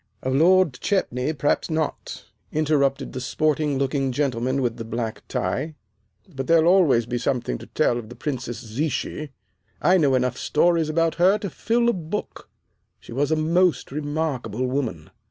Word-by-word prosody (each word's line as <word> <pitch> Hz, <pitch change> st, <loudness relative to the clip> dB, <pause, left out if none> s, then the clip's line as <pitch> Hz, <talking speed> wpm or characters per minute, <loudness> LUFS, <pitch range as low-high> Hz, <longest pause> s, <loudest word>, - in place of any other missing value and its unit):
"Of 130 Hz, -, -1 dB
Lord 175 Hz, +2 st, +4 dB
Chetney 150 Hz, -9 st, 0 dB
perhaps 145 Hz, +3 st, 0 dB
not," 155 Hz, -1 st, -3 dB, 0.3 s
interrupted 140 Hz, -3 st, +1 dB
the 130 Hz, -, -4 dB
sporting 150 Hz, +1 st, 0 dB
looking 135 Hz, 0 st, 0 dB
gentleman 130 Hz, -1 st, 0 dB
with 120 Hz, -1 st, -1 dB
the 115 Hz, -, -5 dB
black 115 Hz, 0 st, -4 dB
tie, 155 Hz, 0 st, -2 dB, 0.5 s
"but 135 Hz, -7 st, -6 dB
there'll 165 Hz, -1 st, +5 dB
always 145 Hz, -12 st, +4 dB
be 120 Hz, +1 st, -2 dB
something 125 Hz, -, -1 dB
to -, -, -11 dB
tell 120 Hz, -, +1 dB
of 110 Hz, -2 st, -10 dB
the 120 Hz, -, -10 dB
Princess 130 Hz, -5 st, -4 dB
Zichy. 145 Hz, +5 st, -3 dB, 0.5 s
I 185 Hz, +1 st, +4 dB
know 140 Hz, -4 st, +3 dB
enough 125 Hz, 0 st, 0 dB
stories 165 Hz, 0 st, +2 dB
about 165 Hz, +1 st, +1 dB
her 190 Hz, +4 st, +5 dB
to 200 Hz, -4 st, -5 dB
fill 235 Hz, +6 st, +1 dB
a 235 Hz, -, +4 dB
book. 180 Hz, +3 st, -5 dB, 0.5 s
She -, -, -11 dB
was 140 Hz, +3 st, 0 dB
a 160 Hz, -, +3 dB
most 165 Hz, -1 st, +1 dB
remarkable 145 Hz, -5 st, -2 dB
woman." 125 Hz, -, -3 dB
145 Hz, 160 wpm, -24 LUFS, 125-160 Hz, 0.5 s, there'll